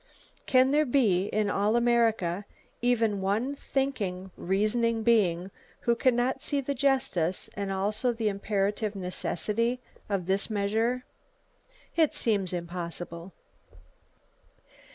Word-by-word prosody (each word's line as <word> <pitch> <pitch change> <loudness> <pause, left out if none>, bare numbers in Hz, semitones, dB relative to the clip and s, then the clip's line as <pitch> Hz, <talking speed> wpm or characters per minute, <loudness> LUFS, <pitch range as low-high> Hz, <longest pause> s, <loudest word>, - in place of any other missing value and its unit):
Can 260 0 +5
there 300 0 +3
be 210 -8 +3
in 215 0 0
all 205 +2 +1
America 225 -6 +2 0.4
even 225 -4 +2
one 215 +8 0
thinking, 205 -11 -2
reasoning 220 +4 +1
being 195 -6 +2 0.3
who 235 - +2
can 250 +1 +3
not 255 +2 0
see 290 -1 0
the 280 +1 -2
justice 250 - +1
and 200 -1 -3
also 210 +5 0
the 225 -2 -2
imperative 205 +1 -1
necessity 210 +6 -1 0.3
of 195 -4 -1
this 195 +4 0
measure? 225 +4 0 0.9
It 320 -3 +3
seems 200 -5 +1
impossible. 170 0 -5
215 Hz, 110 wpm, -28 LUFS, 190-240 Hz, 0.9 s, Can